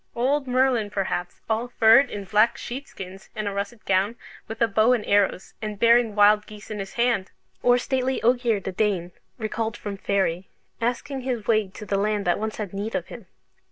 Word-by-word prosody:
Old 270 +3 +1
Merlin, 250 -4 +2
perhaps, 190 -3 -3
"all 225 +2 0
furred 240 +3 +5
in 205 - -5
black 210 +4 +3
sheep 270 +3 -6
skins, 190 0 -10
and 215 -1 -3
a - - -1
russet 200 +3 -5
gown, 195 +4 +1 0.3
with 225 +1 -7
a 230 - +4
bow 220 +4 +3
and 230 -4 -1
arrows, 200 -2 +1
and 215 -1 -4
bearing 230 0 +4
wild 210 0 +5
geese 210 0 -11
in 210 - -4
his 195 -1 -6
hand!" 235 -5 +1 0.3
Or 245 0 +5
stately 260 +1 -1
Ogier 240 -2 +2
the 190 - -5
Dane, 185 -3 0 0.3
recalled 220 -1 -3
from 200 -1 -6
Faery, 195 -2 -1 0.3
asking 250 +3 -2
his 245 -5 -3
way 215 -3 +2
to 200 +3 -10
the 200 - 0
land 205 0 0
that 175 - +1
once 220 0 -3
had 205 -4 -5
need 205 +3 -4
of - - -3
him! - - -10
215 Hz, 195 wpm, -24 LUFS, 200-240 Hz, 0.3 s, furred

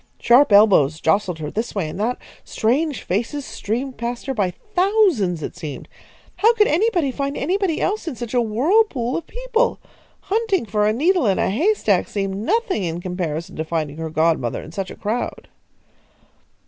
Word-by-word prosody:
Sharp 245 +2 +5
elbows 190 -8 +5
jostled 180 +1 +1
her 150 -2 -5
this 225 +1 -3
way 190 -6 -1
and 155 - -7
that; 235 +4 0 0.3
strange 265 +2 0
faces 240 +9 -2
streamed 250 +5 -4
past 235 +1 -4
her 270 - -2
by 205 -6 0
thousands, 355 - +1
it - - -5
seemed. 155 -6 -7 0.5
How 455 +3 +4
could 425 -2 +5
anybody 345 -4 +1
find 280 +2 -3
anybody 365 +1 0
else 415 -2 -1
in 305 - -3
such 240 -1 -6
a 245 - +3
whirlpool 255 - +1
of 335 - -4
people? - - -1 0.4
Hunting 410 - 0
for 210 0 +1
a - - +3
needle 310 - +2
in 195 - +2
a - - +1
haystack 230 - +1
seemed 195 -1 -3
nothing 375 - 0
in 170 -1 -3
comparison 175 -3 -4
to 160 - -1
finding 155 -2 -3
her 160 0 -4
godmother 155 -6 0
in - - -11
such 190 +2 -4
a - - -9
crowd. 220 +4 -4
230 Hz, 175 wpm, -21 LUFS, -, 0.5 s, Sharp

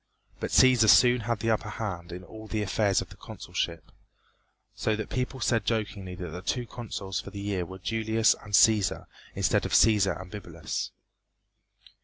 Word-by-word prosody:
But - - -3
Cæsar 125 -4 +5
soon 125 +2 +6
had 115 -2 -2
the 115 0 +1
upper 110 -1 -1
hand 95 -5 -5
in 90 +1 -7
all 110 +3 -11
the 110 -1 -2
affairs 100 -1 +1
of - - -8
the - - -13
consulship, 85 -3 -5 0.8
so 110 - -1
that 110 - -5
the - - -4
people 130 +1 -2
said 115 -2 +1
jokingly 100 -4 -3
that 90 -1 -6
the 90 +3 -7
two 125 +6 -2
consuls 105 -5 -5
for - - -9
the 100 - -8
year 100 -3 -2
were 95 - -9
Julius 110 +3 +2
and 105 - -12
Cæsar, 105 -1 +4 0.3
instead - - +1
of - - -4
Cæsar 105 -5 +4
and 90 -1 -10
Bibulus. 85 -6 -5
105 Hz, 180 wpm, -28 LUFS, 95-115 Hz, 0.8 s, soon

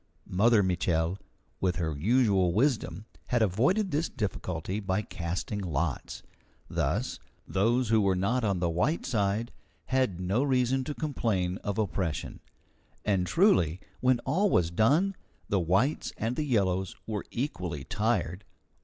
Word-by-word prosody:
Mother 105 +3 +4
Mitchel, 90 0 0 0.4
with 90 -2 +1
her 80 -4 -2
usual 100 - +3
wisdom, 110 - 0 0.2
had 120 -2 +2
avoided 140 - +2
this 155 +4 0
difficulty 95 -4 -3
by 95 0 -1
casting 90 +3 -4
lots. 80 -5 -3 0.4
Thus, - - -1 0.3
those 115 +5 +1
who 110 -1 +4
were 95 -2 +2
not 115 +7 0
on 100 -3 +1
the 85 - +2
white 120 - 0
side 110 -1 0 0.3
had 130 -9 0
no 95 +7 +1
reason 130 -1 +2
to 145 - -4
complain 100 - -1
of 100 0 -3
oppression. 90 -6 -2 0.7
And 95 -4 +1
truly, 90 - +3 0.2
when 125 0 +3
all 185 +12 +1
was 85 - +2
done, 150 - +3 0.3
the 100 - +2
whites 95 - +1
and 115 +3 -1
the 150 - -1
yellows 95 -7 +1
were 105 -3 -4
equally 90 - -3
tired. 105 - -1
105 Hz, 135 wpm, -29 LUFS, 90-125 Hz, 0.7 s, Mother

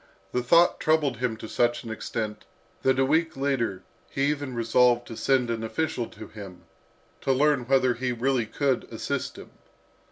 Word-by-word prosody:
The 125 - 0
thought 170 +8 +4
troubled 150 -6 +2
him 120 -2 -1
to 110 - -8
such 120 +2 +1
an 115 - -6
extent, 110 -1 -4 0.4
that 130 0 +2
a 135 - +3
week 160 +2 +1
later 130 -8 -1 0.3
he 135 - -2
even 145 -4 -4
resolved 120 +1 +3
to 115 - -6
send 125 +1 +1
an 115 -1 -3
official 120 0 -2
to - - -11
him, 100 -4 -11 0.6
to 135 - +1
learn 135 -2 +2
whether 130 -2 +3
he 125 +1 -2
really 120 -1 0
could 135 +1 0
assist - - -4
him. - - -11
125 Hz, 170 wpm, -26 LUFS, 115-135 Hz, 0.6 s, thought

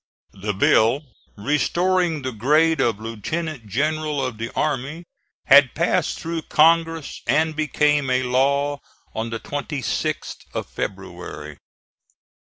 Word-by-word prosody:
The 105 +1 -4
bill 115 +8 +3 0.3
restoring 165 - +1
the 130 - -2
grade 150 +7 +3
of 115 -5 +1
lieutenant 120 +4 -4
general 150 +4 -1
of 120 -4 -5
the 115 +1 -4
army 150 +3 -2 0.4
had 140 -1 +6
passed 170 +3 0
through 165 0 -3
Congress 165 0 +2
and 155 +1 +2
became 150 -2 +1
a 130 0 +2
law 140 +3 +1 0.3
on 110 +1 -3
the 115 0 -4
26th 145 +2 -3 0.2
of - - -2
February. 75 -1 -6
145 Hz, 115 wpm, -22 LUFS, 125-155 Hz, 0.4 s, had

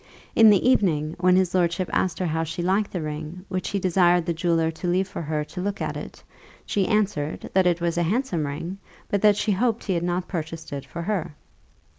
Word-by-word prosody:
In 225 -1 +8
the 205 +2 +4
evening, 160 -11 +2
when 180 0 +4
his 185 -1 +2
lordship 175 0 +1
asked 175 -3 +1
her 185 - -1
how 160 -1 0
she 165 +2 -4
liked 195 +3 +1
the 175 -4 -4
ring, 155 +4 -6
which 185 -1 -2
he 200 - -1
desired 180 -2 +3
the 170 - 0
jeweller 165 -1 +1
to 165 +3 -6
leave 185 +2 +1
for 185 - -6
her 150 -1 -2
to 180 +4 -7
look 200 +1 -2
at - - -3
it, - - -8 0.4
she 195 -2 0
answered, 200 -8 -1
that 190 -1 +4
it 175 -1 +1
was 170 0 0
a 170 -1 +1
handsome 205 - 0
ring, 165 +7 -5 0.3
but 200 - 0
that 210 -1 +5
she 215 - 0
hoped 225 +3 +1
he 195 - -1
had 170 - 0
not 175 +1 -1
purchased 160 -3 -5
it 140 -1 -6
for 170 - -6
her. 175 -5 -2
175 Hz, 225 wpm, -24 LUFS, 165-190 Hz, 0.4 s, In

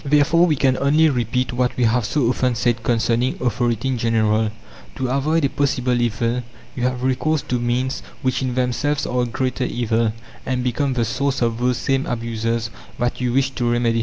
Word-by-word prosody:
Therefore 150 +4 +4
we 155 - +2
can 130 -1 +2
only 155 +3 +4
repeat 125 0 -1
what 125 0 0
we 125 - +1
have 115 0 +2
so 120 +4 +1
often 125 0 +1
said 120 0 0
concerning 120 +2 +1
authority 120 0 0
in 130 -3 -1
general: 110 -1 +2 0.5
"To 130 -1 -2
avoid 145 +4 +1
a - - +1
possible 125 -4 0
evil 120 +1 0 0.3
you 125 - -4
have 125 0 -1
recourse 140 +4 +1
to 125 - -1
means 125 +2 -1 0.2
which 130 0 0
in 130 -2 -2
themselves 130 +4 0
are 125 0 0
a - - +1
greater 130 +2 -2
evil, 115 -2 0 0.3
and 125 -1 -1
become 130 +2 0
the 120 -2 0
source 135 +2 -1
of 115 -1 0
those 125 0 +1
same 135 0 0
abuses 115 -1 -2 0.3
that 120 +1 -1
you 125 -1 0
wish 135 +1 +1
to 120 -2 -1
remedy. 120 -1 +1
125 Hz, 195 wpm, -21 LUFS, 120-130 Hz, 0.5 s, Therefore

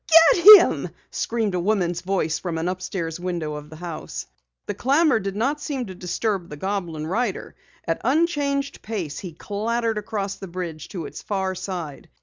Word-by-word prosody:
Get 345 - -1
him!" 355 - +1 0.2
screamed 225 -4 -1
a 180 - 0
woman's 175 -2 0
voice 180 -4 0
from 170 -3 -3
an 165 +2 -1
upstairs 180 -2 -3
window 175 -4 -3
of 150 0 -8
the 155 - -10
house. 165 -1 -6 0.4
The - - -3
clamor 280 0 +3
did 195 -1 -4
not 275 +8 0
seem 275 -4 -3
to 190 - -8
disturb 185 +1 -2
the 150 - -8
goblin 175 -4 -3
rider. 205 +5 -2 0.3
At 165 - -1
unchanged 280 0 +1
pace 185 -10 -4
he 180 - -7
clattered 220 +5 -1
across 205 -2 -3
the 195 - -8
bridge 170 -3 -6
to 175 -6 -5
its - - -8
far 190 -2 -1
side. 175 -7 -6
190 Hz, 170 wpm, -23 LUFS, 170-225 Hz, 0.4 s, clamor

